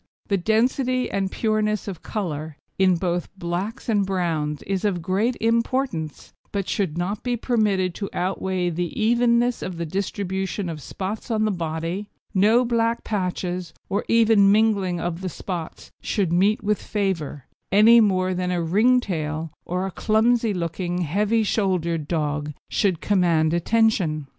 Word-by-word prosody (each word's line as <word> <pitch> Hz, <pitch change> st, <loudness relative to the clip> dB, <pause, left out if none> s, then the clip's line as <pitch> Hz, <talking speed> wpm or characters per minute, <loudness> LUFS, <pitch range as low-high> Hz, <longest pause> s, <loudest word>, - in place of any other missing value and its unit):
The 200 Hz, -, +2 dB
density 250 Hz, +6 st, +1 dB
and 195 Hz, -1 st, -1 dB
pureness 215 Hz, -2 st, 0 dB
of 190 Hz, -4 st, -6 dB
colour, 155 Hz, -7 st, -4 dB, 0.2 s
in 190 Hz, -1 st, +5 dB
both 175 Hz, 0 st, -1 dB
blacks 185 Hz, +6 st, -4 dB
and 210 Hz, -4 st, +2 dB
browns, 165 Hz, -6 st, -1 dB
is 195 Hz, -1 st, -2 dB
of 185 Hz, -5 st, 0 dB
great 205 Hz, +7 st, 0 dB
importance, 230 Hz, -, -1 dB, 0.2 s
but 200 Hz, -2 st, -2 dB
should 175 Hz, -6 st, -1 dB
not 195 Hz, +4 st, -2 dB
be 245 Hz, -1 st, -1 dB
permitted 210 Hz, -7 st, +1 dB
to 200 Hz, +2 st, -5 dB
outweigh 185 Hz, -1 st, -1 dB
the 175 Hz, +4 st, -3 dB
evenness 235 Hz, +2 st, +2 dB
of 180 Hz, -2 st, -5 dB
the 170 Hz, -, -3 dB
distribution 190 Hz, +1 st, -3 dB
of 155 Hz, -2 st, -6 dB
spots 195 Hz, -, -5 dB
on 215 Hz, -2 st, +1 dB
the 215 Hz, -, +1 dB
body; 170 Hz, +3 st, -3 dB, 0.2 s
no 220 Hz, +5 st, +4 dB
black 230 Hz, 0 st, 0 dB
patches, 180 Hz, -3 st, -3 dB
or 200 Hz, -, 0 dB
even 220 Hz, -3 st, +5 dB
mingling 200 Hz, -5 st, +2 dB
of 175 Hz, +1 st, -3 dB
the 185 Hz, -, -3 dB
spots, 175 Hz, -1 st, -6 dB
should 190 Hz, -6 st, 0 dB
meet 200 Hz, +5 st, +2 dB
with 210 Hz, 0 st, 0 dB
favour, 175 Hz, -9 st, -2 dB, 0.3 s
any 220 Hz, +4 st, +7 dB
more 185 Hz, -3 st, +2 dB
than 180 Hz, 0 st, -2 dB
a 180 Hz, -1 st, 0 dB
ring 215 Hz, +10 st, +3 dB
tail 160 Hz, -5 st, -3 dB
or 180 Hz, +2 st, -2 dB
a 195 Hz, -, -4 dB
clumsy 225 Hz, +3 st, +2 dB
looking, 175 Hz, 0 st, -2 dB
heavy 210 Hz, +7 st, +1 dB
shouldered 175 Hz, -7 st, 0 dB
dog 150 Hz, -2 st, -2 dB, 0.2 s
should 185 Hz, -6 st, +1 dB
command 170 Hz, -5 st, +2 dB
attention. 175 Hz, -5 st, +2 dB
190 Hz, 150 wpm, -23 LUFS, 175-215 Hz, 0.3 s, any